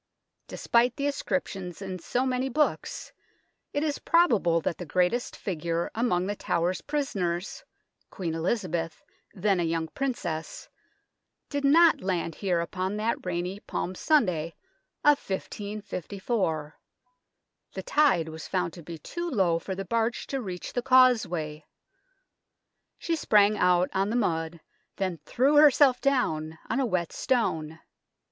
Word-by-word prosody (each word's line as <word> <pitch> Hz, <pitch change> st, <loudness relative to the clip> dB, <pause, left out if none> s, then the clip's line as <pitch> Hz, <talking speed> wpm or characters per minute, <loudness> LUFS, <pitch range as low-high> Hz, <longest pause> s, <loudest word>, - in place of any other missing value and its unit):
Despite 240 Hz, +1 st, +2 dB
the 280 Hz, -, -2 dB
ascriptions 195 Hz, -, -3 dB
in 190 Hz, -2 st, -5 dB
so 245 Hz, +9 st, -1 dB
many 260 Hz, 0 st, 0 dB
books, 300 Hz, +4 st, -1 dB, 0.6 s
it 290 Hz, -, -1 dB
is 300 Hz, -2 st, -1 dB
probable 225 Hz, -, +3 dB
that 165 Hz, -, -2 dB
the -, -, -4 dB
greatest 185 Hz, +9 st, 0 dB
figure 170 Hz, -2 st, -3 dB
among 200 Hz, -6 st, +1 dB
The 205 Hz, +1 st, -2 dB
Tower's 175 Hz, -1 st, -1 dB
prisoners, 200 Hz, -, -2 dB, 0.5 s
Queen 170 Hz, -4 st, -4 dB
Elizabeth 165 Hz, -2 st, -2 dB, 0.3 s
then 195 Hz, 0 st, +1 dB
a -, -, +1 dB
young 165 Hz, -1 st, -1 dB
Princess 205 Hz, -12 st, -4 dB, 0.8 s
did 285 Hz, -1 st, -2 dB
not 315 Hz, 0 st, +5 dB
land 175 Hz, -3 st, -1 dB
here 180 Hz, -1 st, 0 dB
upon 185 Hz, +4 st, -3 dB
that 220 Hz, +2 st, -1 dB
rainy 180 Hz, +2 st, -3 dB
Palm 185 Hz, -, -4 dB
Sunday 180 Hz, -, +1 dB, 0.5 s
of 295 Hz, -1 st, +5 dB
1554. 195 Hz, -4 st, -4 dB, 0.9 s
The -, -, -5 dB
tide 290 Hz, -, +3 dB
was 160 Hz, 0 st, -8 dB
found 180 Hz, -3 st, -1 dB
to 175 Hz, -, -10 dB
be 165 Hz, +1 st, -8 dB
too 345 Hz, -, -5 dB
low 185 Hz, -, +2 dB
for 190 Hz, +3 st, -5 dB
the 195 Hz, +1 st, -5 dB
barge 230 Hz, +4 st, -1 dB
to 270 Hz, -1 st, -3 dB
reach 185 Hz, -5 st, -6 dB
the 245 Hz, -, 0 dB
causeway. 220 Hz, -12 st, +3 dB, 1.3 s
She 335 Hz, -, -1 dB
sprang 210 Hz, -8 st, +4 dB
out 180 Hz, -1 st, +3 dB
on 195 Hz, +1 st, +1 dB
the 225 Hz, -, -1 dB
mud, 165 Hz, -7 st, -1 dB, 0.3 s
then 185 Hz, -4 st, -2 dB
threw 275 Hz, +4 st, +3 dB
herself 285 Hz, -3 st, +6 dB
down 160 Hz, -, 0 dB
on -, -, +1 dB
a 265 Hz, -, +1 dB
wet 180 Hz, -5 st, -1 dB
stone. 160 Hz, -11 st, -1 dB
190 Hz, 135 wpm, -27 LUFS, 170-250 Hz, 1.3 s, herself